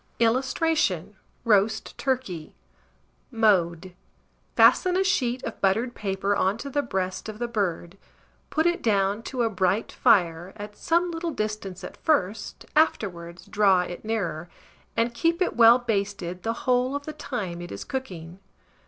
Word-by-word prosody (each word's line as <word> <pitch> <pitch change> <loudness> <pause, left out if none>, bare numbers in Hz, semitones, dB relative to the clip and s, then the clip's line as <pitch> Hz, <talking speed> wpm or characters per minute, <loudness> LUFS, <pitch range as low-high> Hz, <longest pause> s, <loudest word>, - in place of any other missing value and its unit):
[Illustration: 235 - +1 0.3
ROAST 210 -1 +2
TURKEY.] 245 - -3 0.7
Mode. 185 -6 +1 0.6
Fasten 365 -1 +5
a 380 - +3
sheet 260 -10 0
of 225 - -6
buttered 225 +6 +1
paper 200 -1 -1
on 195 +2 +1
to 280 +4 -7
the 290 - +1
breast 190 -5 -3
of 215 - -7
the 240 +1 -2
bird, 195 -4 -3 0.5
put 315 +1 0
it 345 0 +1
down 200 -1 +1
to 245 +1 -2
a 230 - +2
bright 190 +2 0
fire, 175 -1 +2
at 205 0 -8
some 345 +6 +1
little 335 +1 -3
distance 215 - -4
at - - -8
first 210 -9 -1
(afterwards 175 - 0
draw 195 -3 +3
it 175 0 -6
nearer), 180 -7 -3 0.5
and 230 +1 +1
keep 335 +7 +1
it 365 - 0
well 235 0 +8
basted 200 -6 -3
the 225 +3 -1
whole 255 +1 +2
of 285 0 -4
the 310 - -5
time 180 - -5
it 175 - -8
is 100 - -6
cooking. 185 -10 -6
215 Hz, 150 wpm, -25 LUFS, 185-255 Hz, 0.7 s, well